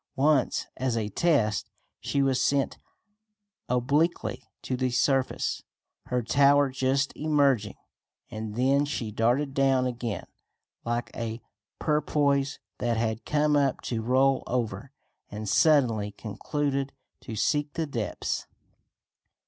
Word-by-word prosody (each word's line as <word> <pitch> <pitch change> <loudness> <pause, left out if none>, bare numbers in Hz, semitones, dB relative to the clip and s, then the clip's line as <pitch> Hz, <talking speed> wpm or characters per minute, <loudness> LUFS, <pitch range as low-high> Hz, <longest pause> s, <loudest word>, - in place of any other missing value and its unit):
Once, 140 -1 +2
as 125 -2 0
a 105 -2 -1
test, 110 - +1 0.3
she 140 - 0
was 135 -1 +2
sent 140 -1 +1 0.9
obliquely 140 +7 +1 0.2
to 130 - -2
the 130 0 0
surface, 130 +1 +1 0.5
her 125 -1 0
tower 140 +3 +4
just 135 +2 0
emerging, 140 -9 +2 0.6
and 110 -1 -5
then 135 +4 +3
she 125 -7 -3
darted 125 +6 +1
downward 135 -2 +2
again, 120 -4 -4 0.6
like 120 +1 -2
a 115 -1 -4 0.4
porpoise 145 -2 +1 0.2
that 120 -1 0
had 110 0 -1
come 150 0 +2
up 140 -2 +2
to 115 -2 -3
roll 130 +3 +3
over, 115 0 -2 0.4
and 105 +1 -6
suddenly 115 -7 +3
concluded 135 +7 -3 0.3
to 115 - -7
seek 145 +6 +1
the 165 -1 -1
depths. 120 -8 -3
130 Hz, 115 wpm, -27 LUFS, 115-140 Hz, 0.9 s, tower